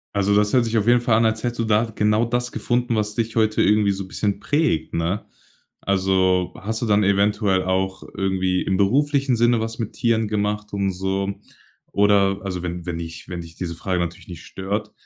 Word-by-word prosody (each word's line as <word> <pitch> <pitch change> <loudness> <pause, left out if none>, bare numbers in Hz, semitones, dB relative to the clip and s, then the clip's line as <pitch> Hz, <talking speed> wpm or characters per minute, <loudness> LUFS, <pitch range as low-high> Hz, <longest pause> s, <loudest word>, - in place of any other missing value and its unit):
Also, 100 0 +2
das 105 0 +2
hört 125 -2 +4
sich 115 0 -2
auf 110 +1 0
jeden 120 0 +5
Fall 120 -2 +3
an, 115 - +3
als 110 +1 0
hättest 120 -1 -2
du 115 - +1
da 110 +1 +3
genau 105 +2 +2
das 120 +1 -2
gefunden, 120 -1 0
was 105 -1 -1
dich 115 +1 -2
heute 110 -1 +2
irgendwie 105 0 +3
so 95 -1 -4
bisschen 100 0 -2
prägt, 145 - 0
ne? 85 +5 -1 0.6
Also, 95 -2 +1
hast 110 +4 -3
du - - 0
dann 105 0 +3
eventuell 100 -1 +2
auch 95 +1 -1
irgendwie 95 -1 0
im 95 - 0
beruflichen 135 +5 +2
Sinne 120 0 +3
was 115 0 -4
mit 110 -3 -4
Tieren 115 -2 +1
gemacht 105 0 -2
und 100 -1 0
so? 95 +2 -2 0.6
Oder 100 -1 +3
also 90 -2 -4
wenn 85 0 -5
wenn 85 -2 -3
dich 80 +1 -8
wenn 90 -2 -5
dich 85 -1 -12
diese 85 -2 -5
Frage 90 +1 -2
natürlich 85 0 -4
nicht 85 -3 -9
stört. 105 +3 -4
100 Hz, 205 wpm, -22 LUFS, 95-110 Hz, 0.6 s, jeden